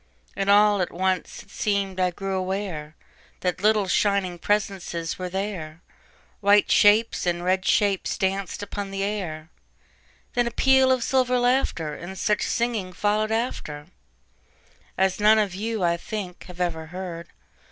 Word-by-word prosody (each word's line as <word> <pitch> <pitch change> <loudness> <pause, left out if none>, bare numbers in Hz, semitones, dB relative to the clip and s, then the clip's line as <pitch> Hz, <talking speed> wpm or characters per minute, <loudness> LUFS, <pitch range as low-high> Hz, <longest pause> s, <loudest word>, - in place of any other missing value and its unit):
And 195 0 -1
all 205 -1 +5
at 180 - -2
once 185 +1 -2
it 200 - -22
seem'd 200 -2 -1
I 180 -1 +3
grew 190 +1 -3
awareThat 185 -1 -5
little, 210 -1 +3
shining 190 -2 +1
presences 190 -5 -2
were 180 0 -3
there,—White 195 +2 -2
shapes 210 -1 +4
and 175 0 0
red 185 +1 +1
shapes 200 -3 +1
danced 195 +1 -2
upon 205 0 -5
the 195 0 -3
air; 175 -6 -4 0.8
Then 240 -1 +1
a - - -2
peal 265 +1 +4
of 255 -2 +2
silver 255 -1 +2
laughter, 245 - +1
And 175 +5 -8
such 210 +2 +1
singing 225 -6 -1
followed 210 +3 0
afterAs 175 -9 -3 1.3
none 215 +1 +6
of 205 -4 +1
you, 215 +1 -3
I 170 0 +2
think, 185 -1 -6
have 180 -1 -12
ever 165 -3 -2
heard. 175 -1 -7
195 Hz, 140 wpm, -24 LUFS, 180-210 Hz, 1.3 s, none